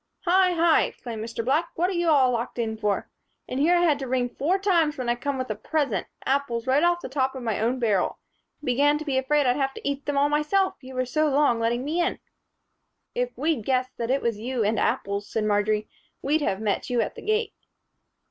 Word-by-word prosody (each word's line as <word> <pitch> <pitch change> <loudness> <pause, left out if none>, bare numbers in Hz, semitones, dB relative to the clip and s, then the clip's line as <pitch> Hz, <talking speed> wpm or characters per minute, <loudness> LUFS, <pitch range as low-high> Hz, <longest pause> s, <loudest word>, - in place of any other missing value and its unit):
"Hi, 365 +1 +4
hi!" 335 -1 +4
exclaimed 230 -3 -7
Mr. 230 0 -5
Black. 300 +6 +1
"What 350 +2 +1
are - - -2
you 345 -1 +1
all 270 -5 +5
locked 240 +1 -3
in 225 -2 -1
for? 210 -2 -1 0.4
And 255 - -3
here 335 +5 +4
I - - +2
had 310 -5 +3
to 270 - -4
ring 250 -1 0
four 315 +9 0
times 345 -6 +2
when 255 -2 -3
I - - +4
came 270 +3 -3
with 255 -3 -3
a - - -2
present 290 +7 -1 0.2
apples 260 -4 0
right 265 +3 +3
off 345 0 +2
the - - -5
top 265 0 -1
of 260 - -6
my 225 -4 -1
own 235 +4 +1
barrel. 215 -7 +1 0.5
Began 290 +3 +3
to 310 - -7
be 270 -3 +1
afraid 290 +2 +2
I'd 250 +1 +2
have 270 -1 -1
to - - -6
eat 280 0 -3
them 290 -1 0
all 285 +1 +4
myself, 300 +7 +1
you 260 0 -10
were 255 0 0
so 305 +5 +1
long 280 -4 +3
letting 235 +3 0
me 325 +4 0
in." 345 - 0 1.0
"If - - -2
we'd 310 -8 0
guessed 255 +1 0
that 230 0 -3
it 270 +2 +1
was 230 -3 -1
you 245 +1 -2
and 215 +2 +1
apples," 200 +1 -1
said 220 - -1
Marjory, 210 0 +1 0.4
"we'd 300 +3 +1
have 195 -8 -1
met 210 -2 -1
you 245 -1 +1
at - - -2
the - - -10
gate." 435 +1 0
265 Hz, 235 wpm, -25 LUFS, 235-305 Hz, 1.0 s, all